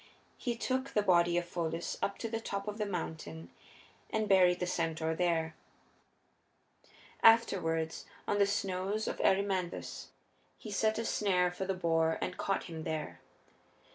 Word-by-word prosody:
He 240 -3 -1
took 260 +3 -1
the 210 - +3
body 175 -2 +4
of 175 - 0
Pholus 170 -1 -3
up 200 - -1
to 230 - -3
the 225 0 -2
top 200 -2 -4
of 210 +1 -4
the 210 - 0
mountain 155 - -5 0.6
and 220 -1 0
buried 180 -2 +5
the 180 - 0
centaur 160 -2 -1
there. 165 -2 0 1.7
Afterward, 165 -8 +4 0.3
on 205 - +1
the 200 - +5
snows 200 +1 -1
of - - -2
Erymanthus, 190 -2 0 0.5
he 215 - -8
set 220 +2 +1
a 230 - -2
snare 180 -5 +2
for 190 +2 -4
the 190 0 -1
boar 165 -2 +2
and - - -3
caught 195 - -1
him 160 -2 -7
there. 155 -2 -4
185 Hz, 150 wpm, -32 LUFS, 165-205 Hz, 1.7 s, buried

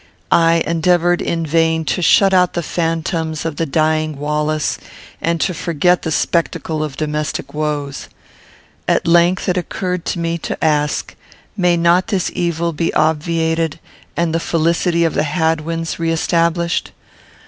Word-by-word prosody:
I 165 0 +4
endeavoured, 175 +1 +2
in 165 -1 -1
vain, 160 +1 +1
to 180 - -1
shut 195 +3 +5
out 180 -1 +3
the 170 - -2
phantoms 165 -1 -2
of 160 -3 -3
the 165 - -1
dying 155 +1 0
Wallace, 150 +1 -1 0.4
and 170 0 0
to 185 - +1
forget 175 +2 +1
the 160 - -3
spectacle 160 -1 0
of 145 -3 -5
domestic 150 0 -3
woes. 150 -2 -3 0.8
At - - +2
length 175 +3 +3
it 180 -1 +1
occurred 180 0 -3
to - - -2
me 170 0 -2
to - - -5
ask, 150 -2 0 0.4
May 180 -3 +2
not 170 +3 +3
this 195 -5 -1
evil 170 -1 -1
be 165 +2 -1
obviated, 160 +1 0 0.4
and 170 -1 0
the 165 - +1
felicity 170 +1 +1
of 165 - 0
the - - +1
Hadwins 160 +1 -1
re 165 0 0
established? 170 +1 0
165 Hz, 150 wpm, -18 LUFS, 155-170 Hz, 0.8 s, shut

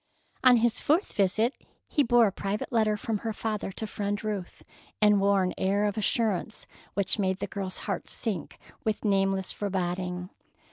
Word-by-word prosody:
On 250 -2 +8
his 235 0 +2
fourth 330 +7 +1
visit 215 +5 +2 0.3
he 295 - +2
bore 240 -3 +5
a 200 - +1
private 200 +2 -3
letter 215 -3 +2
from 215 0 -2
her 225 +1 -3
father 215 -3 -3
to 220 - -4
Friend 205 0 -3
Ruth, 205 -4 -4 0.4
and 210 -2 +5
wore 200 -1 +4
an 180 - -1
air 200 +2 +2
of 205 -1 0
assurance 215 -1 0 0.3
which 200 +2 +1
made 190 -2 +1
the - - -3
girl's 195 -2 -5
heart - - -3
sink 205 -8 -3 0.3
with 220 0 -1
nameless 195 -2 +1
foreboding. 180 -2 -2
205 Hz, 170 wpm, -28 LUFS, 195-220 Hz, 0.4 s, On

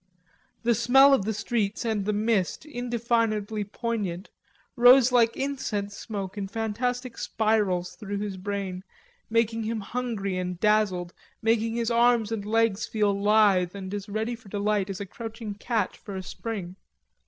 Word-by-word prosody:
The 235 0 +3
smell 270 +5 +6
of 210 -8 +2
the 220 - 0
streets, 215 0 -1
and 215 -3 0
the 210 - +1
mist, 210 - 0
indefinably 230 -5 -1
poignant, 205 -3 -4 0.4
rose 250 0 +7
like 230 -2 +3
incense 215 -8 -3
smoke 200 -2 -5
in 195 - -3
fantastic 235 +4 -3
spirals 210 -5 0
through 205 -2 -4
his 205 -1 -3
brain, 190 -1 -4 0.5
making 230 0 +1
him 220 0 -2
hungry 200 -4 -3
and 180 -1 -4
dazzled, 200 -5 +2 0.3
making 225 0 +1
his 235 0 0
arms 235 -2 +3
and 220 -3 -2
legs 225 -1 +1
feel 210 -2 +1
lithe 200 -3 +3
and 190 -1 -6
as 205 0 -5
ready 220 +3 -2
for 225 -4 -16
delight 205 -1 0
as 195 - -4
a 200 - -4
crouching 225 +1 -7
cat 215 -1 -1
for 200 - -9
a 190 - -4
spring. 190 -3 -6
215 Hz, 155 wpm, -26 LUFS, 200-230 Hz, 0.5 s, rose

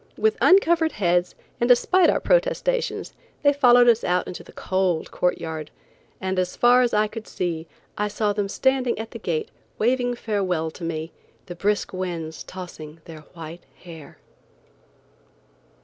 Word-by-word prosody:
With 440 0 +2
uncovered 340 -4 +4
heads, 175 -2 +1 0.2
and 240 - +2
despite 340 +9 +4
our - - +2
protestations, - - 0 0.3
they 285 0 +5
followed 245 -3 +6
us 235 -1 +4
out 180 0 +1
into 180 - -8
the - - -15
cold 185 -3 -1
court 180 - 0
yard, 160 -2 -6 0.5
and 190 0 -1
as 180 0 -2
far 245 +1 +5
as 245 -1 +2
I 210 0 +3
could 220 +1 -8
see 165 -2 -3 0.3
I 210 - +1
saw 210 0 -1
them 205 -1 -2
standing 265 +1 +1
at 225 0 -6
the 230 - -8
gate 165 -6 -3 0.3
waving 245 +1 +1
farewell 185 -8 -1
to 170 - -11
me, 165 0 -4 0.3
the 175 - -7
brisk 205 +4 -1
winds 170 -4 -4
tossing 165 -4 -9
their 160 -2 -10 0.2
white 165 +1 -9 0.2
hair. 165 -5 -12
195 Hz, 155 wpm, -23 LUFS, 170-245 Hz, 0.5 s, followed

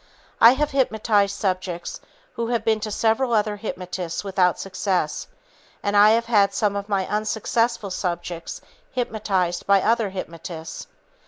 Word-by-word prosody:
I 230 +2 +9
have 295 +2 -1
hypnotized 220 -6 +2
subjects 185 -3 -3 0.3
who 230 - -3
have 235 -2 -1
been 220 -1 +2
to 215 0 -4
several 225 +4 +1
other 210 -1 +1
hypnotists 180 -4 -5
without 185 -3 +2
success, 190 -4 -2 0.6
and 205 0 0
I 205 +1 +8
have 230 +2 +3
had 205 -4 +3
some 205 -2 +1
of 200 +1 -4
my 195 -2 +1
unsuccessful 220 +1 -1
subjects 175 -2 -4 0.3
hypnotized 200 -7 -1
by 200 0 +6
other 225 -2 +2
hypnotists. 165 -3 -7
205 Hz, 140 wpm, -23 LUFS, 185-225 Hz, 0.6 s, I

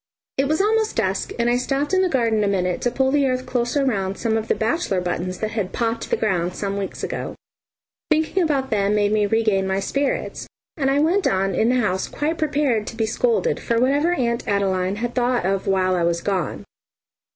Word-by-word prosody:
It 270 +1 +2
was 310 +5 +1
almost 440 +1 +1
dusk, 195 -3 -1
and 235 0 +1
I 240 +1 +3
stopped 275 +6 -1
in 375 - +4
the 375 - +2
garden 230 -6 +1
a - - +1
minute 180 -2 0
to 245 - +1
pull 265 +2 +1
the 285 -1 +3
earth 255 0 -1
closer 250 +3 0
round 195 -6 -1
some 225 -2 0
of 220 0 -2
the - - +2
bachelor's 220 - 0
buttons 180 +1 -3
that 215 0 -3
had 210 -4 -3
"popped" 230 -1 -2
the - - +1
ground 180 -5 0
some 200 -1 -3
weeks 195 - -5
ago. - - -4 0.7
Thinking 315 +4 +2
about 280 -5 0
them 205 -1 +2
made 205 -1 +2
me 210 -1 +2
regain 215 -3 +1
my 190 0 0
spirits, 275 +8 -2 0.3
and 270 -4 0
I 275 - +2
went 345 +6 +2
on 195 0 +1
in 220 +6 +2
the 250 0 +2
house 190 -3 0
quite 315 +3 -2
prepared 280 -8 +1
to - - -6
be 225 -1 0
scolded 475 - +1
for 235 -1 0
whatever 285 +7 +2
Aunt 235 -6 -1
Adeline 190 -1 0
had 240 +3 -3
thought 245 -4 +1
of 195 0 -1
while 185 -1 +2
I 180 - +1
was 170 0 +1
gone. 185 -7 -2
230 Hz, 215 wpm, -22 LUFS, 195-275 Hz, 0.7 s, in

